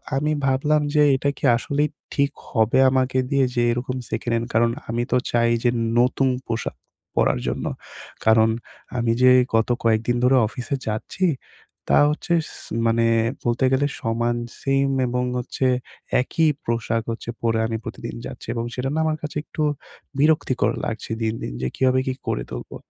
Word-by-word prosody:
আমি 150 Hz, +3 st, +1 dB
ভাবলাম 145 Hz, +3 st, +2 dB
যে 150 Hz, -, +6 dB
এটা 135 Hz, +2 st, 0 dB
কি -, -, -16 dB
আসলেই 145 Hz, +5 st, 0 dB, 0.2 s
ঠিক 140 Hz, -1 st, +2 dB, 0.2 s
হবে 110 Hz, 0 st, +2 dB
আমাকে 130 Hz, 0 st, +1 dB
দিয়ে 140 Hz, -2 st, +3 dB
যে 120 Hz, -, +2 dB
এরকম 125 Hz, +2 st, -2 dB
সেকেন্ড 115 Hz, +1 st, -2 dB
হ্যান্ড। 115 Hz, +1 st, -2 dB
কারণ 115 Hz, +1 st, +3 dB, 0.2 s
আমি 120 Hz, +1 st, 0 dB
তো 125 Hz, -, +4 dB
চাই 115 Hz, 0 st, +3 dB
যে 120 Hz, -, +4 dB, 0.3 s
নতুন 130 Hz, +2 st, +3 dB, 0.2 s
পোশাক 115 Hz, 0 st, -3 dB, 0.4 s
পরার -, -, +2 dB
জন্য। -, -, -2 dB, 0.6 s
কারণ 110 Hz, 0 st, +5 dB, 0.5 s
আমি 120 Hz, -1 st, +1 dB
যে 130 Hz, 0 st, +7 dB, 0.2 s
গত 115 Hz, +1 st, +2 dB
কয়েকদিন 115 Hz, +1 st, +2 dB
ধরে 130 Hz, +2 st, +5 dB
অফিসে 125 Hz, +4 st, -4 dB
যাচ্ছি, 110 Hz, -, -2 dB, 0.6 s
তা -, -, +5 dB
হচ্ছে 150 Hz, +3 st, -2 dB, 0.2 s
স -, -, -12 dB, 0.4 s
মানে 115 Hz, 0 st, +2 dB, 0.4 s
বলতে 120 Hz, +2 st, +1 dB
গেলে 135 Hz, +2 st, +3 dB
সমান 120 Hz, +1 st, 0 dB, 0.2 s
সিম 135 Hz, 0 st, +1 dB, 0.2 s
এবং 125 Hz, +1 st, -1 dB
হচ্ছে 125 Hz, +2 st, -2 dB, 0.6 s
একই 160 Hz, +5 st, +1 dB, 0.2 s
পোশাক 115 Hz, -1 st, -1 dB
হচ্ছে 115 Hz, 0 st, -6 dB
পরে। 115 Hz, -1 st, +1 dB
আমি 115 Hz, 0 st, -2 dB
প্রতিদিন 115 Hz, +1 st, -6 dB
যাচ্ছি -, -, -9 dB
এবং 115 Hz, -1 st, -2 dB
সেটা 130 Hz, +1 st, -2 dB
না 160 Hz, -, +1 dB
আমার 155 Hz, -1 st, 0 dB
কাছে 150 Hz, 0 st, -5 dB
একটু 155 Hz, -, -4 dB, 0.6 s
বিরক্তিকর 135 Hz, -7 st, +2 dB
লাগছে 115 Hz, 0 st, -5 dB
দিন, 110 Hz, -1 st, 0 dB
দিন -, -, -4 dB
যে 65 Hz, -, 0 dB
কিভাবে 130 Hz, 0 st, +3 dB
কি 130 Hz, -, +1 dB
করে -, -, -1 dB
তুলবো। -, -, -7 dB
120 Hz, 165 wpm, -23 LUFS, 115-135 Hz, 0.6 s, যে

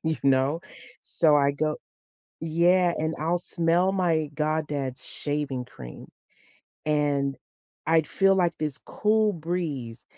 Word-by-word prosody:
you 160 Hz, 0 st, 0 dB
know? 135 Hz, +3 st, +2 dB, 0.4 s
So, 155 Hz, -3 st, +3 dB
I 140 Hz, -1 st, +4 dB
go 150 Hz, +2 st, -1 dB, 0.6 s
Yeah, 170 Hz, +2 st, +3 dB
and 160 Hz, +1 st, -1 dB
I'll 165 Hz, +3 st, 0 dB
smell 175 Hz, +2 st, +1 dB
my 165 Hz, -5 st, +1 dB
goddad's 150 Hz, -4 st, -2 dB
shaving 145 Hz, -4 st, -3 dB
cream, 60 Hz, -, -11 dB, 0.8 s
and 145 Hz, -2 st, +1 dB, 0.5 s
I'd 160 Hz, -1 st, +3 dB
feel 195 Hz, +3 st, +3 dB
like 175 Hz, -2 st, +1 dB
this 150 Hz, -2 st, -2 dB
cool 215 Hz, 0 st, +1 dB
breeze, 155 Hz, -, -4 dB
155 Hz, 120 wpm, -26 LUFS, 140-170 Hz, 0.8 s, I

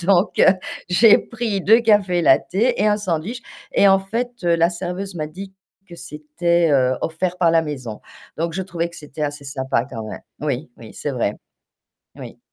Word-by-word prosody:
Donc, 185 Hz, +2 st, +2 dB
heu, 190 Hz, -, +6 dB, 0.3 s
j'ai 205 Hz, +5 st, +6 dB
pris 225 Hz, -4 st, -3 dB
2 220 Hz, +5 st, +5 dB
cafés 205 Hz, -6 st, +3 dB
lattés 210 Hz, -, +2 dB
et 210 Hz, -, +3 dB
un 210 Hz, -1 st, +3 dB
sandwich 200 Hz, +4 st, -3 dB, 0.3 s
et 200 Hz, -, +5 dB
en 195 Hz, 0 st, +6 dB
fait, 230 Hz, +6 st, -3 dB
heu, 170 Hz, -1 st, +3 dB
la 170 Hz, +1 st, +3 dB
serveuse 180 Hz, +2 st, -5 dB
m'a 155 Hz, -2 st, -3 dB
dit 190 Hz, +5 st, -9 dB, 0.4 s
que 170 Hz, -, -10 dB
c'était, 165 Hz, +3 st, -1 dB
heu, 130 Hz, -3 st, +3 dB
offert 175 Hz, +2 st, -2 dB
par 170 Hz, -2 st, +4 dB
la 165 Hz, 0 st, +4 dB
maison. 130 Hz, -8 st, -6 dB, 0.4 s
Donc 165 Hz, +1 st, -1 dB
je 190 Hz, -, -2 dB
trouvais 170 Hz, -2 st, -3 dB
que 170 Hz, -, -16 dB
c'était 150 Hz, 0 st, -8 dB
assez 145 Hz, -1 st, -3 dB
sympa 130 Hz, -3 st, -1 dB
quand 115 Hz, -3 st, -6 dB
même -, -, -7 dB, 0.2 s
oui, 145 Hz, -1 st, -3 dB
oui 110 Hz, -2 st, -12 dB
c'est 145 Hz, -, -4 dB
vrai. 120 Hz, -6 st, -1 dB, 0.8 s
Oui. -, -, -10 dB
170 Hz, 185 wpm, -21 LUFS, 150-195 Hz, 0.8 s, heu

